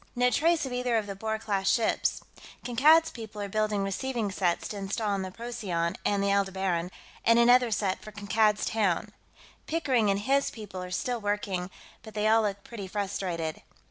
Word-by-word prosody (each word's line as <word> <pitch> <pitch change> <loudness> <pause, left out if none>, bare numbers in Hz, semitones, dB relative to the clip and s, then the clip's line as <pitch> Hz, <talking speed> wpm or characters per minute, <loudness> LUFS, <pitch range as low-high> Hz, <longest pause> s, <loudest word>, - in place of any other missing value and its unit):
No 250 0 +3
trace 325 +5 +2
of 260 - -5
either 245 -1 +1
of 215 - -1
the 200 - -5
Boer 220 +2 -2
class 200 -3 -1
ships. 225 +1 +1 0.4
Kankad's 310 +7 +5
people 220 -3 -9
are 205 - -3
building 210 0 0
receiving 220 +2 -2
sets 180 -2 0
to 210 - -5
install 200 +2 -2
on 200 -1 0
the 190 - -4
Procyon 190 -6 -3
and 200 -1 +1
the 200 - +2
Aldebaran, 190 -3 0 0.3
and 230 0 +5
another 245 +1 +6
set 200 -3 -1
for 215 - -10
Kankad's 210 +1 +1
Town. 210 -1 0 0.6
Pickering 265 -10 +1
and 200 0 +1
his 275 +4 +2
people 205 -5 -8
are 180 - -6
still 235 +6 -2
working, 205 -3 -2 0.3
but 220 -1 -12
they 210 0 +1
all 225 +1 +5
look 200 -2 -2
pretty 210 -5 -7
frustrated. 185 -5 -3
210 Hz, 180 wpm, -28 LUFS, 195-235 Hz, 0.6 s, another